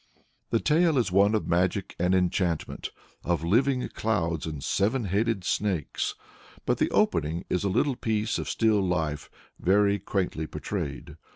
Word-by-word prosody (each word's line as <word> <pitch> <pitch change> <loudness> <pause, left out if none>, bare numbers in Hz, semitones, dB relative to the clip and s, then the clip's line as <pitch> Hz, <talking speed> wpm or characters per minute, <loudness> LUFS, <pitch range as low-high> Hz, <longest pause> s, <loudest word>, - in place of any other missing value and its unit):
" - - -43
The 115 - +2
tale 160 +2 +3
is 115 -7 +1
one 100 +3 +4
of 105 - -1
magic 90 +3 0
and 90 +2 +2
enchantment, 90 -2 -1 0.3
of 85 -2 0
living 125 +8 +2
clouds 85 -8 -1
and 75 -3 -5
seven 115 +6 +1
headed 105 +1 0
snakes; 95 -4 -1 0.5
but - - +1
the - - +2
opening 80 +4 +1
is 90 - +1
a 100 - +1
little 135 +8 +1
piece 110 -2 -1
of - - -4
still 110 -3 +2
life 80 -5 -1 0.3
very 100 +2 +3
quaintly 90 -5 -2
portrayed. - - -5
100 Hz, 155 wpm, -27 LUFS, 85-110 Hz, 0.5 s, one